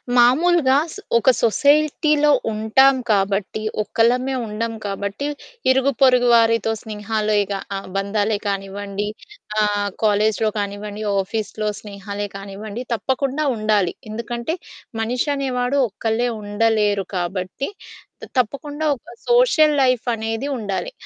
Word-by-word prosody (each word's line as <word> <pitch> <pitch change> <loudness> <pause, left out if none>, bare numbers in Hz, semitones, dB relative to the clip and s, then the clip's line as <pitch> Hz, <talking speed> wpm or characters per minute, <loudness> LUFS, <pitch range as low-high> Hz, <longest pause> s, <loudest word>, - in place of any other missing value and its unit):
మామూలుగా 265 +4 +4 0.2
సొ 410 - -9 0.2
ఒక 235 - +3
సొసైటీలో 300 +4 +3 0.2
ఉంటాం 220 +6 +4
కాబట్టి 200 0 +1 0.2
ఒక్కలమే 250 +5 +1
ఉండం 225 +2 -3
కాబట్టి 200 +6 -3 0.4
ఇరుగుపొరుగు 260 -1 +4
వారితో 230 -1 +4
స్నేహాలేగా 210 -2 -1 0.4
బంధాలే 205 +2 0
కానివ్వండి 200 +1 -3 0.5
ఆహ్, 205 -1 +1
కాలేజిలో 215 +1 +2
కానివ్వండి 205 +1 -4 0.2
ఆఫీస్‌లో 215 +2 -3
స్నేహాలే 205 0 -6
కానివ్వండి 200 +3 -7
తప్పకుండా 270 +5 -1
ఉండాలి. 215 -4 +1 0.2
ఎందుకంటే 235 +6 -3 0.5
మనిషి 245 +5 -1
అనేవాడు 260 -1 -1
ఒక్కళ్ళే 225 +4 -1
ఉండలేరు 205 -1 +1
కాబట్టి 185 +7 -3 0.5
త - - -4
తప్పకుండా 290 +5 -1
ఒక - - -34 0.2
సోషల్ 480 -12 +5
లైఫ్ 255 -2 +2
అనేది 225 +4 -3
ఉండాలి. 210 - -3
220 Hz, 100 wpm, -21 LUFS, 205-260 Hz, 0.5 s, సోషల్